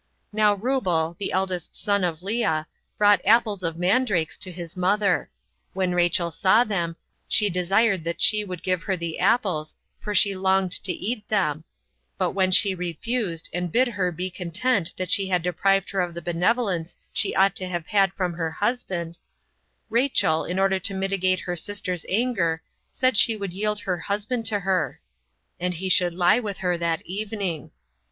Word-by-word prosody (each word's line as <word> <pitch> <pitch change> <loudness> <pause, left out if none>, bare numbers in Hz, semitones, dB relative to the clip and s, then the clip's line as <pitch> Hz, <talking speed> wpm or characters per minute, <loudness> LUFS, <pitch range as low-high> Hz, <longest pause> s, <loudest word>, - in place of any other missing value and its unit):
Now 210 -1 +3
Reubel, 190 -8 0
the 200 - -3
eldest 185 -2 -2
son 200 -2 0
of 170 -1 -2
Lea, 195 -7 0 0.3
brought 205 -3 +5
apples 215 -2 +3
of 165 -2 -3
mandrakes 180 - +1
36 - - -12
to 185 - -6
his 170 0 -8
mother. 195 - +1 0.4
When 185 -1 0
Rachel 175 -1 +1
saw 190 +8 +4
them, 175 -7 -2 0.3
she 210 -2 +2
desired 190 +2 +2
that 170 0 -3
she 210 0 +5
would 180 -4 -7
give 185 -2 0
her 190 0 -2
the 170 -1 -4
apples, 180 -10 +1 0.2
for 210 -1 -4
she 200 -2 +4
longed 190 0 +1
to 190 - +2
eat 210 +4 -4
them; 165 -8 0 0.5
but - - 0
when 190 -1 +1
she 190 +1 +4
refused, 180 +1 -3
and 175 -1 -2
bid 255 +5 +3
her 185 -6 -1
be 180 +3 -4
content 185 +2 0
that 185 -1 -3
she 195 -1 +2
had 180 -3 +1
deprived 195 +2 +1
her 195 -1 0
of 175 -1 -3
the 170 - -5
benevolence 180 0 0 0.2
she 205 - 0
ought 195 0 +4
to 185 - -3
have 175 -3 -4
had 195 -2 +2
from 180 -3 -2
her 165 -1 -2
husband, 175 -4 -3 0.7
Rachel, 235 - +2
in 180 - -3
order 195 0 +2
to 195 +1 0
mitigate 190 -1 0
her 180 - -3
sister's 180 -1 -4
anger, 185 -7 0 0.3
said 255 -3 +1
she 225 - +5
would 200 -4 -5
yield 210 +2 -1
her 185 -6 -2
husband 210 +5 -2
to 205 -1 0
her; 190 -1 -1 0.6
and 180 0 -1
he 190 +3 -3
should 180 -2 +3
lie 180 +5 +4
with 205 -5 -5
her 180 -1 0
that 170 -1 -2
evening. 195 -4 -4
185 Hz, 175 wpm, -24 LUFS, 175-205 Hz, 0.7 s, brought